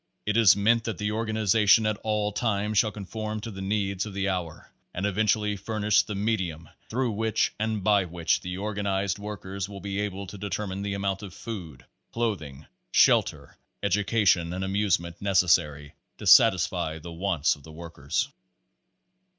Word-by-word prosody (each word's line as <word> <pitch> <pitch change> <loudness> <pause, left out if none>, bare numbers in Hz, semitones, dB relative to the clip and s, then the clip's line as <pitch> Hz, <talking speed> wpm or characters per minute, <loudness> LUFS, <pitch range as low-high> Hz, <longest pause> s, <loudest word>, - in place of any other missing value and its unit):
It 105 - 0
is 110 -6 +7
meant 110 +3 +3
that 115 - -3
the 105 0 -2
organiza 110 -1 +1
tion 110 0 +7
at 110 -1 0
all 105 -1 -1
times 105 -1 0
shall 110 -3 +2
conform 110 +2 -5
to 115 +1 -6
the 95 -1 -8
needs 100 -1 -1
of 100 - -9
the 100 0 0
hour 90 -4 -5 0.2
and 95 - -2
eventually 105 +1 +1
furnish 105 +1 +1
the 105 - -6
medium 95 -6 -2 0.2
through 125 +1 0
which 110 +1 0
and 110 -2 -1
by 100 -2 +3
which 85 -1 0
the 90 0 -5
organized 100 -1 -2
workers 100 -2 -6
will 100 -1 -8
be 100 +1 -4
able 100 -1 -3
to 100 +2 -10
deter 100 +1 -3
mine 95 0 -5
the 100 0 -3
amount 100 0 -2
of 100 -3 -9
food, 80 - -8 0.3
clothing, 80 - -3 0.3
shelter, - - +3 0.3
education 100 -3 +2
and 95 +1 -3
amusement 95 -4 -1
necessary 85 -7 +2 0.2
to - - -9
satisfy 80 0 +5
the 85 +2 -9
wants 85 -3 +1
of 75 - -18
the 80 - -13
workers. 80 -3 -3
100 Hz, 165 wpm, -26 LUFS, 90-105 Hz, 0.3 s, is